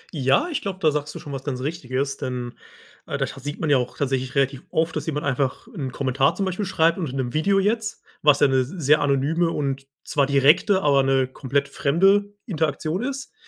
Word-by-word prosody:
Ja, 135 - +2
ich 305 - -2
glaube, 195 -2 -4
da 155 -3 +3
sagst 150 0 -3
du - - -4
schon 145 - -8
was 135 -1 -5
ganz 135 -3 -3
richtiges, 135 -2 -3
denn 125 -3 -4 0.5
äh, - - -3
da - - 0
scha - - -9
sieht 145 +3 -6
man 155 - 0
ja 140 - +6
auch 125 -1 -3
tatsächlich 130 -1 -2
relativ 135 -1 +1
oft, 160 0 0
dass - - -3
jemand 150 -2 -2
einfach 140 - -1
'n 135 -7 -4
Kommentar 135 +4 +1
zum 195 - -1
Beispiel 190 +2 -2
schreibt 170 -1 +2
und 160 - -2
in 130 - -7
'nem 125 -2 -2
Video 195 +6 +2
jetzt. 215 +2 -1 0.2
Was 150 -1 +5
ja 145 - +5
'ne 135 -1 +2
s 130 0 -1
sehr 150 -4 +2
anonyme 145 +5 +1
und 135 -3 -3 0.2
zwar 140 -1 +2
direkte, 150 +8 +4
aber 140 -2 +4
'ne 135 -1 +2
komplett 140 +2 -2
fremde 195 +9 +2
Interaktion 160 0 -1
ist. 270 - -5
145 Hz, 220 wpm, -23 LUFS, 135-170 Hz, 0.5 s, ja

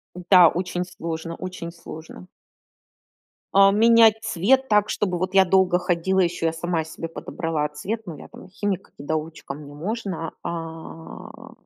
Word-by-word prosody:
Да, 180 -1 +6
очень 180 0 -3
сложно, 165 -2 -6
очень 180 -2 -7
сложно. 165 +1 -11 1.3
А, 195 0 +7
менять 225 +1 +5
цвет 260 +10 +2
так, 210 -1 +3
чтобы 180 -4 -1
вот 185 +1 -3
я 195 -1 +7
долго 185 -1 +3
ходила, 180 +1 0
ещё 170 -2 -1
я 160 - -1
сама 165 0 -2
себе 160 +1 -7
подобрала 160 -2 -3
цвет. 210 +10 -5
Ну 165 -4 -7
я - - -11
там - - -13
химик-недоучка, 160 -7 -4
мне 145 0 -11
можно. 180 0 -4
А, 165 -1 -8
175 Hz, 140 wpm, -23 LUFS, 165-195 Hz, 1.3 s, А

